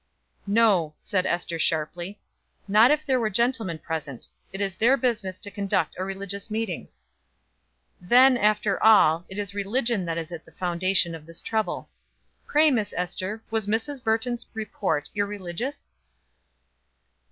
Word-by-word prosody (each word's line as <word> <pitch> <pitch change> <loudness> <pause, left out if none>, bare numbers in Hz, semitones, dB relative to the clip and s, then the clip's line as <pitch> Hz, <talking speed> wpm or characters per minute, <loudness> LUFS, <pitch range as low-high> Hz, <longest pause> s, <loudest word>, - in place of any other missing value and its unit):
"No," 200 -8 +3
said 185 -2 -1
Ester 175 -1 -2
sharply, 175 +5 -1 0.5
"not 215 +4 +6
if 305 +1 +1
there 260 -3 +2
were 220 -2 0
gentlemen 225 -5 0
present. 155 -6 -5 0.2
It 195 - -7
is 195 -1 0
their 250 +5 +4
business 220 -8 -1
to 205 - -1
conduct 200 -1 -1
a - - -1
religious 195 +2 -4
meeting." 215 -5 -3 1.1
"Then, 250 +8 +6
after 210 -3 +1
all, 175 -6 +5
it 190 - -7
is 200 -1 -3
religion 210 0 0
that 165 -1 -2
is 165 0 -5
at 170 -2 -7
the - - -19
foundation 180 0 +1
of 160 -1 -10
this 165 0 -6
trouble. 220 -1 -2 0.6
Pray, 305 +1 +4
Miss 220 -6 -1
Ester, 185 +4 -3
was 220 -2 +1
Mrs. 245 +5 -2
Burton's 230 +2 -1
report 185 -9 -2
irreligious?" 205 - -4
200 Hz, 140 wpm, -25 LUFS, 175-225 Hz, 1.1 s, not